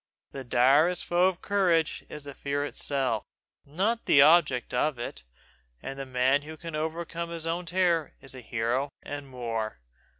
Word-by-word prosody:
The 135 - -7
direst 140 +8 +3
foe 175 +1 +3
of 185 -1 -3
courage 180 -6 +1
is 150 - -8
the 140 0 -8
fear 140 +1 -2
itself, 135 -6 0 0.4
not 200 +10 -1
the 140 - +6
object 150 -4 +5
of 135 +2 +1
it; - - -6 0.6
and 135 - -7
the 135 - -5
man 130 +2 +2
who 155 +2 -9
can 165 0 -7
overcome 165 +2 -3
his 165 -1 -5
own 170 +1 -2
terror 170 -3 +1
is 135 0 -11
a 130 - -9
hero 120 +4 -1
and 145 -1 -7
more. 115 - -4
145 Hz, 165 wpm, -28 LUFS, 130-170 Hz, 0.6 s, the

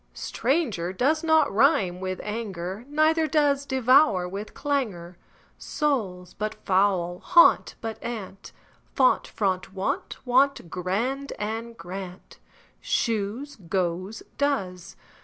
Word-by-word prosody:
Stranger 235 - -1
does 290 - +1
not 315 -5 +3
rime 210 - +3
with 185 0 -4
anger, 210 -1 -5
Neither 310 +2 +2
does 285 -3 +1
devour 260 -7 +4
with 200 +4 -7
clangour. 215 - -2 0.4
Soul, 210 - -2
but 215 +1 -2
foul 185 -2 +2
and 175 - -14
gaunt, 340 - +6
but 225 -1 -5
aunt; 200 -4 -7 0.4
Font, 260 -2 +3
front, 190 -2 -2
wont; 190 - -3
want, 260 -7 +2
grand, 235 +10 -2
and, 225 +2 -4
grant, 180 +1 -9 0.4
Shoes, 230 +5 -2
goes, 185 +2 -3 0.2
does. 190 -12 -2
215 Hz, 110 wpm, -25 LUFS, 185-275 Hz, 0.4 s, gaunt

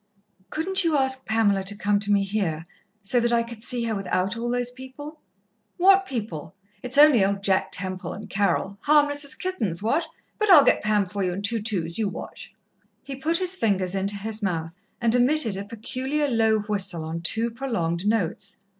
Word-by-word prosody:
"Couldn't 380 +5 0
you 325 -3 +2
ask 265 -1 -1
Pamela 220 -3 +2
to 200 +2 0
come 205 0 +1
to 205 0 -1
me 200 -1 +3
here, 190 -6 -2 0.4
so 245 +5 +1
that 240 0 0
I 235 -1 +2
could 230 -1 -10
see 240 +1 -1
her 230 -1 -1
without 195 0 -1
all 235 +1 -3
those 245 0 -1
people?" 265 +4 -10 0.6
"What 385 +1 +5
people? 205 - -6 0.3
It's 250 +1 0
only 290 -8 +7
old 195 0 -1
Jack 190 -1 +2
Temple, 185 0 -1
and 210 +1 -9
Carol. 200 -1 -1
Harmless 290 -1 +3
as 285 - 0
kittens, 215 - -3
what? 315 +9 0 0.3
But 425 -1 0
I'll 305 -7 +8
get - - +3
Pam 210 -1 +1
for 195 +2 -4
you 180 -1 -1
in 200 +3 -5
two 225 +2 0
twos. 185 -4 -1
You 215 -3 0
watch." - - -9 0.5
He 275 - -6
put 315 +5 -1
his 370 0 0
fingers 195 - 0
into 195 +1 -1
his 215 +2 -4
mouth 165 -4 -2 0.3
and 230 -1 +1
emitted 250 -3 +3
a 195 +1 -5
peculiar 260 +7 -2
low 220 -4 +2
whistle 195 -6 -1
on 165 +1 -5
two 225 +7 0
prolonged 200 -8 -2
notes. 200 -2 -1
220 Hz, 190 wpm, -24 LUFS, 195-265 Hz, 0.6 s, I'll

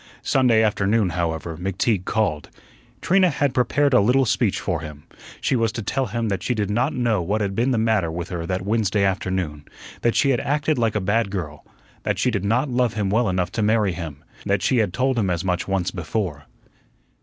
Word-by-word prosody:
Sunday 120 -4 +3
afternoon, 105 -1 +2
however, 85 -1 -3
McTeague 95 +2 -1
called. 90 -10 -1 0.5
Trina 185 0 +4
had 145 -4 0
prepared 140 +3 +2
a 125 - +6
little 130 +6 +3
speech - - +1
for - - -2
him. 75 -2 -9 0.4
She - - 0
was 115 -2 +1
to 115 - -4
tell 130 +5 -1
him 115 +2 -2
that 100 -1 -2
she 125 - -1
did 105 -2 -1
not 125 +7 +1
know 115 -7 0
what 100 +6 -1
had 100 -2 -1
been 120 +6 +1
the 125 - +1
matter 110 -6 +1
with 85 +2 -5
her 85 -3 -4
that 90 +1 -2
Wednesday 105 -1 +1
afternoon; 95 -6 -1 0.4
that 120 - +1
she 140 - +3
had 125 - +1
acted 145 0 0
like 115 -3 +1
a 105 - +1
bad 100 +3 +1
girl; 85 -7 -5 0.4
that - - -1
she 125 - +1
did 100 -4 -2
not 120 +8 +1
love 125 -4 0
him 100 -3 -1
well 115 0 +2
enough 90 -1 -1
to 110 - -2
marry 105 -2 +2
him; 80 -4 -7 0.2
that 100 -1 0
she 130 - +2
had 105 -5 +2
told 130 +4 0
him 100 -4 0
as 85 -1 -1
much 90 -1 -1
once 95 -2 0
before. 85 -4 -3
105 Hz, 210 wpm, -22 LUFS, 90-120 Hz, 0.5 s, a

